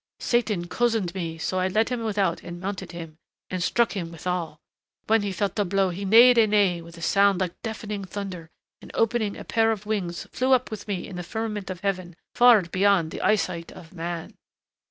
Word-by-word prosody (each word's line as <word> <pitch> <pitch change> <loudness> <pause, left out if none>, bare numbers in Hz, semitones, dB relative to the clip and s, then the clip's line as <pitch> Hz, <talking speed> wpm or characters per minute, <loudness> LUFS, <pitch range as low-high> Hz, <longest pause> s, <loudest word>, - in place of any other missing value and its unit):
"Satan 215 -7 0
cozened 225 -4 0
me, 165 -4 -4
so 185 +3 -2
I 185 - +1
led 215 +5 +1
him 245 -2 -2
without 200 -6 0
and 175 0 -8
mounted 190 -1 -5
him... 165 -2 -9 0.3
and 185 -1 -2
struck 235 +6 +2
him 170 -4 -4
withal. 170 -2 -4 0.5
When 225 0 +3
he 205 -1 -2
felt 195 0 -1
the 205 - +2
blow 195 0 +1
he 195 +3 -5
neighed 235 +4 +7
a 220 - +5
neigh 200 -5 +2
with 170 +1 -13
a 165 - -9
sound 200 -1 +3
like 180 -2 -3
deafening 210 -3 -5
thunder 185 -4 -6 0.3
and - - -12
opening 225 -2 +1
a - - -7
pair 225 0 +2
of 210 -2 -4
wings 190 -5 -2
flew 260 +1 +2
up 255 -2 +2
with 215 0 -7
me 195 -4 -3
in 190 - -8
the 180 - -4
firmament 210 +1 -4
of 185 -1 -6
heaven 185 -3 -2 0.2
far 240 -5 +6
beyond 185 -1 +2
the - - -6
eyesight 185 -5 0
of 165 0 -13
man. 170 -1 -5
195 Hz, 205 wpm, -25 LUFS, 175-215 Hz, 0.5 s, neighed